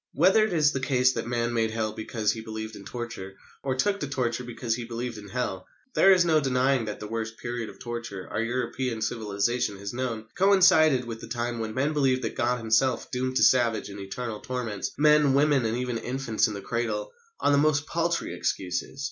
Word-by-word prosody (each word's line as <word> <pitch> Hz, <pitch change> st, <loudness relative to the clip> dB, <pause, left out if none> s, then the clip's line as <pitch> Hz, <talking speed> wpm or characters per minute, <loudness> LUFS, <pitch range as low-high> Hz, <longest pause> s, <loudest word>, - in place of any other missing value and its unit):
Whether 190 Hz, +8 st, +5 dB
it 215 Hz, -, -3 dB
is 150 Hz, -3 st, +4 dB
the 135 Hz, -, -2 dB
case 130 Hz, -1 st, +2 dB
that 115 Hz, -1 st, -3 dB
man 120 Hz, 0 st, -1 dB
made 115 Hz, -1 st, +1 dB
Hell 110 Hz, -1 st, -2 dB
because 110 Hz, 0 st, -1 dB
he 110 Hz, -, -5 dB
believed 110 Hz, 0 st, -6 dB
in 100 Hz, -, -11 dB
torture, 115 Hz, -6 st, -6 dB, 0.3 s
or 130 Hz, -2 st, -1 dB
took 200 Hz, +10 st, +1 dB
to 145 Hz, -, -3 dB
torture 125 Hz, -3 st, -1 dB
because 120 Hz, -1 st, -3 dB
he 120 Hz, +1 st, -3 dB
believed 115 Hz, 0 st, -5 dB
in 105 Hz, -, -11 dB
Hell, 95 Hz, -6 st, -3 dB, 0.3 s
there 195 Hz, -, +6 dB
is 180 Hz, -2 st, +5 dB
no 160 Hz, -2 st, +4 dB
denying 130 Hz, -2 st, +1 dB
that 105 Hz, -, -5 dB
the 105 Hz, -, -6 dB
worst 110 Hz, 0 st, -4 dB
period 120 Hz, -2 st, -4 dB
of -, -, -13 dB
torture 115 Hz, -5 st, -6 dB
our -, -, -1 dB
European 120 Hz, -1 st, -2 dB
civilisation 110 Hz, -1 st, -1 dB
has 100 Hz, +2 st, -6 dB
known 120 Hz, -3 st, -3 dB
coincided 175 Hz, -9 st, +5 dB
with 115 Hz, -1 st, -7 dB
the -, -, -8 dB
time 120 Hz, 0 st, -3 dB
when 110 Hz, -1 st, -4 dB
men 140 Hz, +4 st, +1 dB
believed 130 Hz, -3 st, +2 dB
that 115 Hz, -, -3 dB
God 125 Hz, +1 st, +1 dB
Himself 115 Hz, +3 st, +1 dB
doomed 130 Hz, 0 st, -2 dB
to -, -, +3 dB
savage 115 Hz, -5 st, +3 dB
and 100 Hz, 0 st, -8 dB
eternal 105 Hz, +3 st, -5 dB
torments 120 Hz, -6 st, -3 dB
men, 150 Hz, -2 st, +5 dB
women, 140 Hz, -3 st, +3 dB
and 110 Hz, +2 st, -1 dB
even 125 Hz, -2 st, -2 dB
infants 125 Hz, -2 st, 0 dB
in 105 Hz, -, -5 dB
the 100 Hz, -, -6 dB
cradle, 110 Hz, -1 st, -2 dB, 0.3 s
on -, -, +2 dB
the 140 Hz, -, +4 dB
most 145 Hz, -1 st, +2 dB
paltry 170 Hz, +1 st, -1 dB
excuses. 90 Hz, +8 st, -3 dB
120 Hz, 210 wpm, -27 LUFS, 110-135 Hz, 0.3 s, there